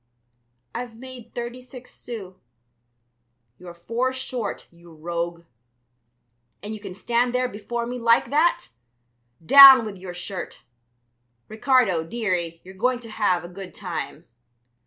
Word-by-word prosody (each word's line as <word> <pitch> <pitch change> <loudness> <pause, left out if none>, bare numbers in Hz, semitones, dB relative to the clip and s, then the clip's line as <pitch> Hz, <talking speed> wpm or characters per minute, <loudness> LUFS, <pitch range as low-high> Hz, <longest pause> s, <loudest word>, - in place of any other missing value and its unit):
"I've 235 -1 -6
made 250 -1 -12
thirty 240 +1 -5
six 255 0 -13
sous." 210 -6 -8 1.3
"You're 175 -1 -11
four 230 +9 -2
short, 255 -4 -5
you 170 0 -18
rogue. 170 +1 -5 1.2
And 210 +1 -5
you 215 - -7
can 195 -3 -9
stand 240 +5 0
there 250 0 +1
before 235 +2 -5
me 245 +1 -5
like 230 +2 +3
that! 305 - +2 0.8
Down 270 - +10
with 205 -2 -7
your 180 -1 -9
shirt! 180 +1 -7 0.8
Ricardo, 220 -6 +2
dearie, 175 -4 -3
you're 190 - -12
going 250 +6 0
to 230 -2 -11
have 185 -5 0
a - - -7
good 185 +1 -10
time." 175 -3 -6
220 Hz, 130 wpm, -23 LUFS, 180-245 Hz, 1.3 s, Down